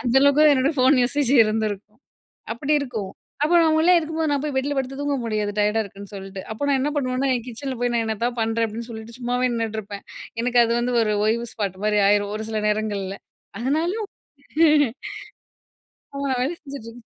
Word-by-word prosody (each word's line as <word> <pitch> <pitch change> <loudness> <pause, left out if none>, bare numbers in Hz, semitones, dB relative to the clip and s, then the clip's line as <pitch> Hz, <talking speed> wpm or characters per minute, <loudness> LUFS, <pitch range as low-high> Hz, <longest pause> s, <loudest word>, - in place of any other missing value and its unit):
அந்த 245 0 0
அளவுக்கு 295 +2 +6
என்னோட 270 +2 +2
போன் 260 +1 +5
யூசேஜ் 275 +1 +1
இருந்திருக்கும். 215 0 -3 0.6
அப்டி 285 +6 0
இருக்கும். 220 -8 -4 0.3
அப்போ 310 +4 +2
அவங்கள்லாம் 320 -2 +5
உள்ளே 355 +2 +5
இருக்கும்போது 320 -1 -2
நான் 280 -1 0
போய் 290 -3 -3
பெட்ல 285 +2 0
படுத்து 270 +1 -3
தூங்க 285 -1 0
முடியாது 210 -2 -1
டயர்டா 210 +2 +2
இருக்குன்னு 200 +1 -11
சொல்ட்டு. 195 -1 -7
அப்போ 220 - -7
நான் 270 - +3
என்ன 295 +2 0
பண்வேன்னா, 260 0 0
என் 240 - -6
கிச்சன்ல 260 +2 -5
போய் 245 0 +1
நான் 230 - +1
என்னத்தாவது 235 +2 -2
பண்றேன் 225 +1 +1
அப்டின்னு 230 +2 -7
சொல்லிட்டு 225 +1 -9
சும்மாவே 245 +1 0
நின்னுட்டுருப்பேன். 220 -3 -4 0.4
எனக்கு 245 0 +3
அது 230 - 0
வந்து 245 0 -1
ஒரு 215 -1 +1
ஓய்வு 235 +2 +1
ஸ்பாட் 195 -4 -3
மாரி 210 -1 +3
ஆயிரும் 205 0 +2
ஒரு 220 - -5
சில 215 -1 -1
நேரங்கள்ல. 205 -2 -2 0.4
அதனால. 310 +8 0 2.2
ஆ - - -10
நான் 260 - 0
வேல 270 - 0
செஞ்சுட்ருந்தேன். 245 -5 -9
235 Hz, 180 wpm, -23 LUFS, 215-275 Hz, 2.2 s, அளவுக்கு